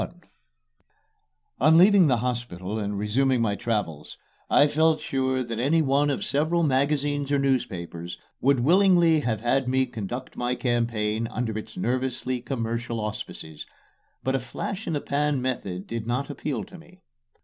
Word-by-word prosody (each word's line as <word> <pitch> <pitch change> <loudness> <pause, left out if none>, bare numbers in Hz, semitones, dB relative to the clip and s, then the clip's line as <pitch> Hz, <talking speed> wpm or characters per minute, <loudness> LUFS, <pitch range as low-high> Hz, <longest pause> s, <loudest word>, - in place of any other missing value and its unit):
XXXI - - -4 1.5
On 160 +1 +6
leaving 190 -1 +7
the 125 -3 +3
hospital 110 -5 -3
and 100 -1 -3
resuming 125 +5 +1
my 110 -3 +1
travels, 100 -10 -3 0.3
I 145 - +6
felt 155 +2 +3
sure 130 -3 -1
that 115 -2 -5
any 155 +6 +3
one 140 +1 +2
of 140 - -1
several 160 +4 +1
magazines 145 0 +1
or 145 - +3
newspapers 90 -11 -2 0.2
would 135 -1 +3
willingly 175 +1 +5
have 110 -7 -2
had 130 +2 +1
me 130 +1 +2
conduct 120 +2 -6
my 125 +1 -1
campaign 115 -3 0
under 115 -2 -3
its 110 0 -7
nervously 130 0 -1
commercial 115 -2 -3
auspices; 105 -7 -6 0.6
but 130 - 0
a 135 - +1
flash 185 - -5
in - - -1
the 145 - -1
pan 145 0 0
method 100 -8 -3
did 115 -1 -5
not 125 +4 -1
appeal 135 -7 -3
to 180 - -12
me. 180 +3 -19
130 Hz, 155 wpm, -25 LUFS, 115-145 Hz, 1.5 s, leaving